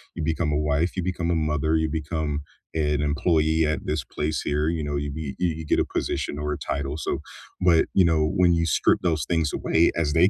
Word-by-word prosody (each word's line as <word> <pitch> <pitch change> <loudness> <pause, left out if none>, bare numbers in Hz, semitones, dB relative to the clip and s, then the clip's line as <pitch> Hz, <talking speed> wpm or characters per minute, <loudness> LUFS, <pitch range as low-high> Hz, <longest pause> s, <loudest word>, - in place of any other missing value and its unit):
you 80 - -3
become 80 0 0
a - - +2
wife, 75 +3 0
you 90 - 0
become 90 -2 -2
a - - +2
mother, 75 0 +1
you 80 0 0
become 80 -1 -2 0.3
an 75 -2 +1
employee 80 +2 +2
at 75 0 -2
this 75 -2 -1
place 75 +3 -2
here, 75 +2 0
you 80 -2 -1
know, 75 0 -2
you 70 0 -3
be 70 -2 -5
you 90 -1 +2
you 80 - -6
get - - +2
a - - +4
position 75 - -2
or 75 0 -2
a - - -4
title, 70 +1 -3
so - - -2 0.4
but, 85 -3 +5
you 95 - +5
know, 80 -2 +3
when 90 0 +3
you 85 0 +1
strip 80 - +3
those 80 -4 +1
things 80 -4 0
away- 80 +1 +2
as 75 -3 0
they 90 +5 +5
80 Hz, 235 wpm, -25 LUFS, 75-85 Hz, 0.4 s, but